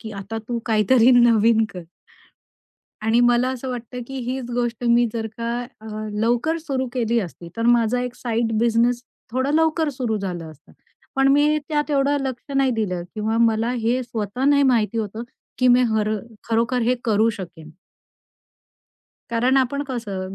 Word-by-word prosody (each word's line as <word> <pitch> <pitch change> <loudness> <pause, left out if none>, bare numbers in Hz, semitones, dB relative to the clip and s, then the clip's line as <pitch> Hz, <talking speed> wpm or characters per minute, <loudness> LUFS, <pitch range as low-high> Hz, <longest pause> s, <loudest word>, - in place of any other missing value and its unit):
की 220 - -8
आता 200 +3 -6
तू 240 - -1
काहीतरी 225 +3 +4
नवीन 230 -1 +4
कर. 180 - -6 1.2
आणि 225 +2 +3
मला 245 +1 +3
असं 260 0 -4
वाटतं 245 0 -6
की 270 - -8
हीच 255 -1 -4
गोष्ट 240 -1 -2
मी 235 0 +4
जर 225 -1 -3
का 230 0 -2 0.3
अ, 220 - -12 0.3
लवकर 245 +8 +1
सुरु 270 -5 -3
केली 235 -2 0
असती 170 -3 -8
तर 230 - -2
माझा 240 0 +3
एक 250 -1 -4
साइड 230 -1 -1
बिझनेस 235 +1 +2 0.3
थोडं 260 +3 0
लवकर 320 0 +2
सुरु 245 -5 -2
झालं 175 -4 -5
असतं. 155 0 -19 0.4
पण 270 0 +4
मी 295 +2 +4
त्यात 295 0 -1
एवढं 285 0 +2
लक्ष 260 +1 -7
नाही 270 -1 +3
दिलं 195 -6 -2
किंवा 220 +1 -1
मला 225 0 +2
हे 245 +1 0
स्वतः 230 0 -4
नाही 285 0 +4
माहिती 230 -4 +2
होतं 220 +1 -4 0.4
की 255 -1 +4
मी 245 +1 +5
हर 215 -1 +1 0.4
खरोखर 235 +2 +1
हे 245 +2 +2
करू 220 0 +3
शकेन. 175 -6 -9 1.6
कारण 245 +3 +2
आपण 270 +2 +1
कसं 200 -7 -4
235 Hz, 160 wpm, -22 LUFS, 220-255 Hz, 1.6 s, मी